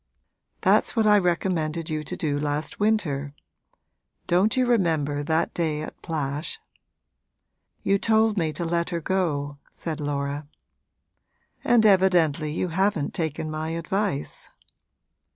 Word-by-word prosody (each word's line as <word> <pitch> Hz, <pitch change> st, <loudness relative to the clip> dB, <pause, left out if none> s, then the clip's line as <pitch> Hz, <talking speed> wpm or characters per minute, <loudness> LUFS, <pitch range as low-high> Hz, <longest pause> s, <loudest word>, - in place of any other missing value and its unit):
'That's -, -, +3 dB
what 225 Hz, -2 st, +3 dB
I 210 Hz, -1 st, +6 dB
recommended 170 Hz, -3 st, -1 dB
you 155 Hz, 0 st, -1 dB
to -, -, -4 dB
do 145 Hz, -2 st, -1 dB
last 150 Hz, +1 st, -3 dB
winter. 150 Hz, -10 st, 0 dB, 0.9 s
Don't 190 Hz, +8 st, +2 dB
you 255 Hz, -, +4 dB
remember 160 Hz, -11 st, +1 dB
that 160 Hz, +2 st, 0 dB
day 155 Hz, -3 st, -1 dB
at -, -, -9 dB
Plash?' 150 Hz, -2 st, -3 dB, 1.2 s
'You 195 Hz, 0 st, +2 dB
told 220 Hz, 0 st, +3 dB
me 165 Hz, -5 st, 0 dB
to 170 Hz, -, -3 dB
let 170 Hz, +1 st, 0 dB
her 170 Hz, -1 st, -2 dB
go,' 150 Hz, -6 st, -1 dB
said 160 Hz, -2 st, -5 dB
Laura. 145 Hz, 0 st, -3 dB, 1.2 s
'And 235 Hz, -2 st, +4 dB
evidently 175 Hz, -7 st, +4 dB
you 175 Hz, +3 st, -2 dB
haven't 190 Hz, -3 st, 0 dB
taken 155 Hz, -1 st, -3 dB
my 155 Hz, +1 st, -3 dB
advice.' 185 Hz, -2 st, -3 dB
165 Hz, 125 wpm, -25 LUFS, 150-190 Hz, 1.2 s, I